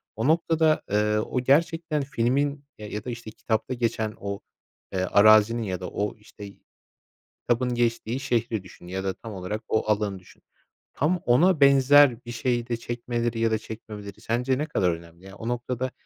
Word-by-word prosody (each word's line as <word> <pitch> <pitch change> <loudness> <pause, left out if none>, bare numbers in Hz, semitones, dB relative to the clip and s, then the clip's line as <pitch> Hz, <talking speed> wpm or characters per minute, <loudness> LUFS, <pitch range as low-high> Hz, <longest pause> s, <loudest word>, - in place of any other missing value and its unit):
O 115 +3 -1
noktada, 160 -1 +3
eee, 105 +1 +2
o 110 +4 -1
gerçekten 160 +3 +2
filmin, 140 +2 0
eee, 105 -1 -9
ya 105 - -4
da, - - -4
işte, 120 -2 -7
kitapta 110 +3 -2
geçen 115 -3 -1
o, 100 0 -4 0.5
eee, 95 - -1
arazinin 110 +4 +5
ya 95 -4 -3
da 90 - -5
o, 105 0 -3
işte, 105 -1 -12 0.9
kitabın 125 +1 0
geçtiği 120 +1 0
şehri 120 -6 -1
düşün 90 -1 -14
ya 95 +2 -4
da 95 -1 -1
tam 110 +3 -10
olarak 95 +3 -4
o 110 0 0
alanı 105 -2 -1
düşün. 90 - -20 0.5
Tam 170 +5 0
ona 155 +8 +4
benzer 140 -2 +6
bir 120 - -6
şeyi 120 0 -1
de 120 -2 -2
çekmeleri 120 0 -3
ya 115 0 +2
da 110 - +2
çekmemeleri 105 -2 -9
sence 125 +3 0
ne 150 - -1
kadar 95 - +1
önemli? 85 +2 -10
Ya, 95 0 -11
o 115 - -7
noktada 125 +1 -2
115 Hz, 175 wpm, -25 LUFS, 105-130 Hz, 0.9 s, benzer